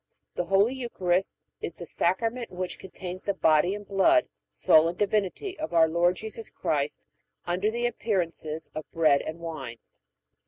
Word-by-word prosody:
The 175 - -2
Holy 195 +7 +3
Eucharist 190 -8 -1 0.3
is - - -4
the 175 - -8
Sacrament 225 +9 0
which 180 0 -5
contains 185 0 -7
the 200 - 0
body 160 +2 +3
and 205 -1 -9
blood, 310 - +4 0.2
soul 155 +1 +5
and 175 +1 -3
divinity, 210 - -1
of 315 - -4
our 165 -1 +6
Lord 170 +2 +2
Jesus 220 +2 -7
Christ 145 -1 -2 0.4
under 180 +4 0
the 235 +2 -1
appearances 175 -9 -2
of 155 0 -6
bread 155 -4 +4
and 155 - -5
wine. 155 -8 -6
180 Hz, 155 wpm, -27 LUFS, 165-215 Hz, 0.4 s, our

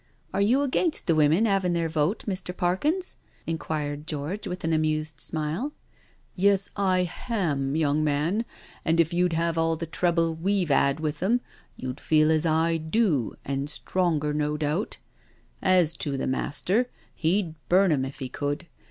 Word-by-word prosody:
'* - - -36
Are 200 - +1
you 245 +8 +3
against 305 +4 0
the 165 - +3
women 155 +7 +4
havin' 195 -4 +2
their 170 -1 +1
vote, 160 +5 0
Mr. 185 -2 -4
Parkins?" 295 - 0 0.3
inquired 150 -2 -3
George, 155 +7 -3
with 180 - -5
an 165 0 +1
amused 155 -1 0
smile. 160 - -3 0.3
" - - -33 0.3
Yes, 195 0 +2
I 185 -2 +2
hantf 155 - -1
young 155 -1 +2
man, 155 +9 +1 0.4
and 165 +1 +2
if 165 +1 +3
you'd 180 0 +2
had 165 0 +1
all 165 0 +2
the 165 +1 -4
trouble 165 0 +1
we've 180 -1 0
'ad 140 +1 +3
with 155 -2 -2
them, 235 +7 +2 0.4
you'd 130 +1 -5
feel 155 0 +3
as 160 +1 +2
I 165 +1 +2
do, 160 - +1
and 140 +1 -2
stronger, 155 -3 0
no 150 0 0
doubt. 155 +7 -1 0.6
As 180 -4 +4
to 140 -3 -2
the - - -2
Master, 190 - 0 0.2
he'd 170 +1 0 0.2
burn 185 0 +5
'em 140 -4 +2
if 135 +1 -6
he 130 - -4
could. 145 +6 -3
165 Hz, 170 wpm, -26 LUFS, 150-185 Hz, 0.6 s, burn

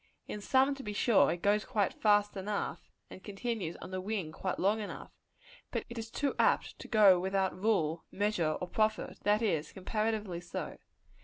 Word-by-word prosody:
In 210 - -5
some, 265 +5 +3
to 275 - -8
be 210 -4 -5
sure, 220 +1 +4
it 170 - -4
goes 205 +1 +3
quite 205 -3 0
fast 205 -1 +3
enough, 200 +1 -3 0.2
and 190 - -11
continues 205 -4 -3
on - - -8
the 185 0 -3
wing 190 -5 -3
quite 185 +3 -3
long 205 +3 +2
enough; 210 - -7 0.6
but - - -3
it 235 -1 -6
is 225 0 -6
too 280 +3 -1
apt - - +2
to - - -9
go 205 -5 +6
without 190 +1 0
rule, 175 -5 +1
measure 190 -6 0
or 180 - -4
profit 215 +2 0
that 210 +2 +3
is, 160 -8 0
comparatively 210 -2 -2
so. 175 - -6
205 Hz, 180 wpm, -32 LUFS, 185-220 Hz, 0.6 s, go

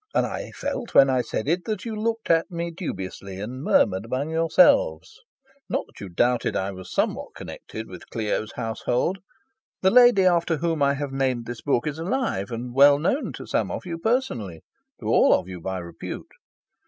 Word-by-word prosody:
And - - +3
I - - -5
felt, 235 - -5
when 135 -1 +7
I 130 -1 +2
said 120 - -4
it, 175 +3 0
that 215 -2 -3
you 225 -2 -4
looked 225 0 -1
at 165 +2 +3
me 170 -1 -4
dubiously, 95 - -6
and 120 +6 -6
murmured 95 -8 +3
among 130 +6 -2
yourselves. 220 - +3 0.5
Not - - -1
that - - -18
you 100 - -7
doubted 120 +7 +1
I 95 +1 -1
was 95 -1 -10
somewhat - - -1
connected 110 0 -8
with 90 -2 -11
Clio's 110 -1 -2
household. 120 +10 -1 0.6
The 190 - +5
lady 240 -6 +7
after 170 -2 +3
whom 165 -1 -1
I 140 0 +3
have 145 -1 -4
named 130 -3 0
this 120 0 -7
book 135 -4 +1
is 150 +1 -3
alive, 180 - -1
and 120 +1 -5
well 140 +2 +7
known 180 - 0
to - - -8
some - - 0
of - - -5
you 170 -2 -5
personally, 135 - -1 0.4
to - - -10
all - - +5
of - - -3
you 90 -2 -8
by 95 +2 -3
repute. 85 -2 -7
140 Hz, 190 wpm, -24 LUFS, 110-175 Hz, 0.6 s, when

